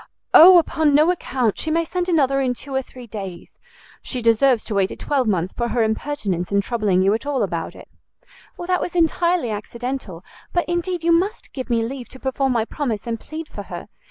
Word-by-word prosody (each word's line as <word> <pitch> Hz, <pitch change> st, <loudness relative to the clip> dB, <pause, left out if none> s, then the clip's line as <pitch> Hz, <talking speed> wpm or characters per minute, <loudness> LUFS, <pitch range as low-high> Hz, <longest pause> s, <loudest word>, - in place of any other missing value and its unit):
"O 360 Hz, +3 st, +10 dB
upon 315 Hz, -3 st, +2 dB
no 310 Hz, +4 st, +5 dB
account! 255 Hz, -, -1 dB
She 320 Hz, -, -3 dB
may 330 Hz, +1 st, +1 dB
send 360 Hz, +2 st, -2 dB
another 275 Hz, -5 st, +2 dB
in 250 Hz, -2 st, 0 dB
two 275 Hz, +3 st, -9 dB
or 265 Hz, -, +1 dB
three 255 Hz, -1 st, -12 dB
days. 195 Hz, -5 st, -8 dB, 0.4 s
She 255 Hz, -, -4 dB
deserves 230 Hz, +1 st, +3 dB
to 220 Hz, -, -4 dB
wait 195 Hz, -1 st, +2 dB
a -, -, -7 dB
twelvemonth 215 Hz, -, 0 dB
for 235 Hz, -, -1 dB
her 235 Hz, 0 st, +1 dB
impertinence 220 Hz, -6 st, -2 dB
in 200 Hz, -, +3 dB
troubling 200 Hz, -4 st, +1 dB
you 195 Hz, +2 st, +3 dB
at 230 Hz, +6 st, -3 dB
all 270 Hz, -5 st, 0 dB
about 170 Hz, -4 st, -3 dB
it." -, -, -13 dB, 0.7 s
"That 365 Hz, +1 st, -1 dB
was 355 Hz, -, -4 dB
entirely 340 Hz, -4 st, +2 dB
accidental: 215 Hz, -3 st, -5 dB, 0.3 s
but 350 Hz, -, +1 dB
indeed 345 Hz, 0 st, -2 dB
you 335 Hz, -, +3 dB
must 375 Hz, +7 st, 0 dB
give 260 Hz, -2 st, -6 dB
me 230 Hz, -1 st, +1 dB
leave 250 Hz, +1 st, -6 dB
to 260 Hz, -, -13 dB
perform 265 Hz, 0 st, 0 dB
my 225 Hz, -2 st, +1 dB
promise 235 Hz, -6 st, -3 dB
and 230 Hz, -1 st, -3 dB
plead 315 Hz, +5 st, -7 dB
for -, -, -8 dB
her. -, -, -7 dB
260 Hz, 205 wpm, -21 LUFS, 220-320 Hz, 0.7 s, O